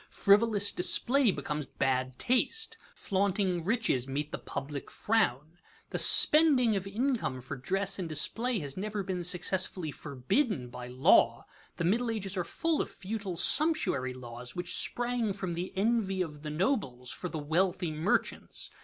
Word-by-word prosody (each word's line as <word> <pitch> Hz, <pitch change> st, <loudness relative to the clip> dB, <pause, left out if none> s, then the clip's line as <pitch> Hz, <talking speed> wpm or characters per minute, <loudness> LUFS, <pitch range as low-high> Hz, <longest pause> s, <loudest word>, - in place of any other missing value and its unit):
Frivolous 205 Hz, 0 st, +3 dB
display 245 Hz, +8 st, +4 dB
becomes 150 Hz, -6 st, -3 dB
bad 130 Hz, -1 st, -2 dB
taste. 350 Hz, -, +1 dB, 0.2 s
Flaunting 190 Hz, -2 st, -1 dB
riches 195 Hz, -, 0 dB
meet 145 Hz, +3 st, -4 dB
the -, -, -5 dB
public 140 Hz, 0 st, -6 dB
frown. 160 Hz, -, -1 dB, 0.3 s
The -, -, -2 dB
spending 280 Hz, -8 st, +6 dB
of 195 Hz, 0 st, -3 dB
income 225 Hz, -, -2 dB
for 130 Hz, +3 st, -7 dB
dress 195 Hz, +9 st, -2 dB
and 175 Hz, -3 st, -4 dB
display 225 Hz, -, -1 dB
has 140 Hz, -2 st, -5 dB
never 205 Hz, +1 st, -4 dB
been 180 Hz, -2 st, -4 dB
successfully 180 Hz, -1 st, +1 dB
forbidden 145 Hz, -, -2 dB
by 125 Hz, 0 st, -8 dB
law. 125 Hz, +1 st, +3 dB, 0.3 s
The -, -, -2 dB
Middle 230 Hz, +8 st, +1 dB
Ages 205 Hz, -4 st, -3 dB
are 180 Hz, -, -1 dB
full 325 Hz, -, -1 dB
of -, -, -4 dB
futile 195 Hz, -2 st, -6 dB
sumptuary 230 Hz, -, +1 dB
laws 120 Hz, 0 st, -9 dB
which 175 Hz, 0 st, -1 dB
sprang 240 Hz, -3 st, 0 dB
from 190 Hz, -3 st, -5 dB
the 175 Hz, +2 st, -5 dB
envy 195 Hz, -3 st, 0 dB
of 150 Hz, -3 st, -9 dB
the 155 Hz, -, -6 dB
nobles 150 Hz, -, -2 dB
for 180 Hz, -, -6 dB
the 160 Hz, -, -5 dB
wealthy 175 Hz, +3 st, 0 dB
merchants. 155 Hz, +6 st, -2 dB
185 Hz, 150 wpm, -29 LUFS, 150-220 Hz, 0.3 s, spending